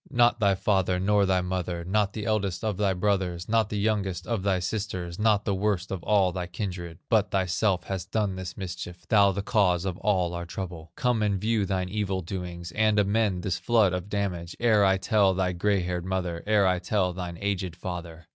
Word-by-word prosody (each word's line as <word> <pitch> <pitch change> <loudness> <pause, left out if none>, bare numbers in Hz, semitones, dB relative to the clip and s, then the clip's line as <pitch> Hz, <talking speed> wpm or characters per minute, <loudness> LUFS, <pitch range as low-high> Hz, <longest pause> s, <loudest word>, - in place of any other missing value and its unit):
Not 120 -2 +3
thy 100 -3 +3
father, 95 -2 +1
nor 100 +1 +3
thy 95 -1 +2
mother, 90 -2 -3
Not 100 +2 +1
the 105 -2 -5
eldest 100 -3 -1
of 105 -4 -1
thy 100 -1 +2
brothers, 90 -2 -1
Not 110 -1 +2
the 105 - -3
youngest 100 -4 -1
of 115 -4 -1
thy 95 -1 +1
sisters, 90 -2 -4
Not 105 -1 +3
the 100 - +1
worst 95 -2 -1
of 95 -3 -3
all 100 -1 +3
thy 90 0 -4
kindred, 90 -4 -5
But 105 -5 +2
thyself 95 0 +1
hast 95 -1 -5
done 105 -2 0
this 95 -1 -6
mischief, 90 -2 -7
Thou 100 -2 +5
the 100 +1 -3
cause 95 -4 +2
of 95 -2 -2
all 90 -5 +1
our 85 0 -5
trouble. 85 -3 -7
Come 125 -3 +1
and 100 -2 +1
view 110 -1 +1
thine 95 -1 -1
evil 95 -2 -2
doings, 85 -1 -6
And 110 +1 +2
amend 100 -2 +1
this 95 -2 -1
flood 110 -6 +3
of 90 +2 -4
damage, 90 -5 -3
Ere 110 -3 +4
I 95 -1 +4
tell 100 -2 +2
thy 95 -1 +1
gray 100 +2 +1
haired 90 -1 -2
mother, 90 -3 -2
Ere 105 -2 +4
I 90 -1 +2
tell 95 -1 0
thine 90 -1 -5
aged 95 -4 -2
father. 85 -2 -7
95 Hz, 205 wpm, -27 LUFS, 90-105 Hz, -, Thou